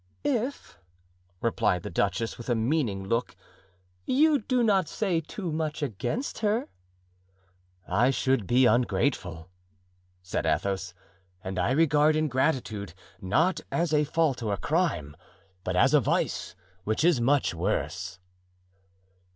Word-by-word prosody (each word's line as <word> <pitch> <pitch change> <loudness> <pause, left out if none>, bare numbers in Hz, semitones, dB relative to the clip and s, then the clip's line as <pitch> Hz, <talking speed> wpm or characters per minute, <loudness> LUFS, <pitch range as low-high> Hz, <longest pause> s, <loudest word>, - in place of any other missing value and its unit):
"If," 255 - -2 0.6
replied 90 -6 +1
the - - -6
duchess, 100 +5 -1
with 120 - -7
a 120 - +3
meaning 115 -4 0
look, 115 +3 -1 0.7
"you 300 +2 +4
do 250 +2 0
not 195 -6 +3
say 185 -6 0
too 170 +2 -5
much 155 -1 -2
against 130 - -3
her." 220 +2 0 1.2
"I 110 +8 +3
should 130 -5 +1
be 125 +1 +4
ungrateful," 110 - +1 0.8
said 90 - -2
Athos, 95 -2 -1 0.5
"and 95 0 -4
I 90 - +1
regard 150 0 +4
ingratitude, 130 - -1 0.3
not 155 - +1
as 170 -2 0
a 150 0 +4
fault 150 -3 0
or 105 -3 -1
a - - -2
crime, 150 - -1 0.5
but 90 0 -2
as 90 - +4
a - - +7
vice, - - -1 0.3
which 110 +8 -1
is 165 -7 +4
much 135 -1 +2
worse." 90 0 -2
130 Hz, 125 wpm, -27 LUFS, 100-165 Hz, 1.2 s, a